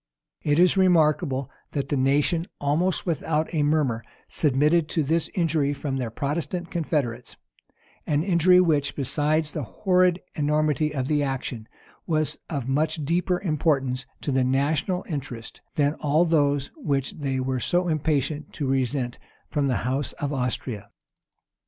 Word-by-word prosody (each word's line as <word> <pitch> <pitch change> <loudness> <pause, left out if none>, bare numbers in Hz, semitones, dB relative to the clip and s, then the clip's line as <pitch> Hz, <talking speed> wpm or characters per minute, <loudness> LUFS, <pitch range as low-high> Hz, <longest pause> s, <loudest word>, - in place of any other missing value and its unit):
It 145 0 +1
is 180 +2 +5
remarkable, 155 -7 +3 0.2
that 140 - -2
the - - +1
nation, 145 +6 +2
almost 160 +6 0
without 160 -1 -1
a 155 - +1
murmur, 145 -6 +1 0.2
submitted 150 +3 +2
to 160 - 0
this 160 +3 +1
injury 155 -5 +1
from 135 -1 -3
their 125 -3 -2
Protestant 160 +7 -3
confederates; 140 -8 -2 0.7
an 150 0 +1
injury 180 0 +5
which, 155 -6 +2
besides 150 +3 0
the 155 - -3
horrid 180 - +2
enormity 150 0 +1
of 135 -3 -2
the 150 0 +2
action, 130 -5 -3 0.4
was 155 -3 0
of 140 -6 -3
much 150 +2 0
deeper 180 +3 +1
importance 135 -7 0
to 145 - -2
national 145 +7 0
interest, 135 -7 -6
than 145 -1 +2
all 155 +3 +3
those 145 -4 +1
which 135 -3 -1
they 135 -2 -1
were 130 0 -1
so 175 +8 +1
impatient 150 -2 -1
to 145 - -3
resent 130 -1 -1 0.3
from 145 -2 0
the 125 - +1
house 135 +3 -1
of 145 0 -3
Austria. 125 -5 -3
145 Hz, 140 wpm, -25 LUFS, 135-160 Hz, 0.7 s, is